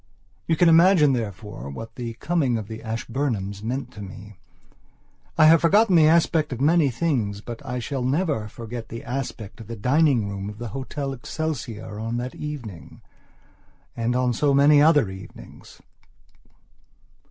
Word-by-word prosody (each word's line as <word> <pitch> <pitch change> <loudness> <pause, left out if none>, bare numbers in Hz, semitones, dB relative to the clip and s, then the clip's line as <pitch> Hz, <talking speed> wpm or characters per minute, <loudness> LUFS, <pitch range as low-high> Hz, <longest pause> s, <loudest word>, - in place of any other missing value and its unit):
You 165 - +2
can 175 +2 +4
imagine, 165 -3 +6
therefore, 105 - -5
what 115 +11 -8
the 120 -3 -5
coming 135 -1 0
of 110 -2 -6
the 110 +1 -8
Ashburnhams 115 -3 -3
meant 125 +3 -4
to 105 - -10
me. 100 0 -11 1.0
I 155 - +6
have 160 +1 +7
forgotten 195 +3 +4
the 155 -2 +6
aspect 160 -2 +3
of 125 - -4
many 155 +1 +3
things, 120 -8 -1
but 120 +5 -8
I 125 -2 -4
shall 130 +2 -3
never 140 - 0
forget 115 +1 -8
the 115 - -7
aspect 120 -5 -5
of 110 - -11
the 115 - -6
dining 130 0 +2
room 100 0 -5
of 105 - -9
the 120 0 -6
Hotel 135 +2 -4
Excelsior 125 -6 -5
on 115 +2 -3
that 125 +1 -4
eveningand 120 - -8 1.0
on 120 +2 0
so 140 +4 +2
many 145 +1 +6
other 150 -6 +5
evenings. 95 0 -13
125 Hz, 155 wpm, -24 LUFS, 110-150 Hz, 1.0 s, have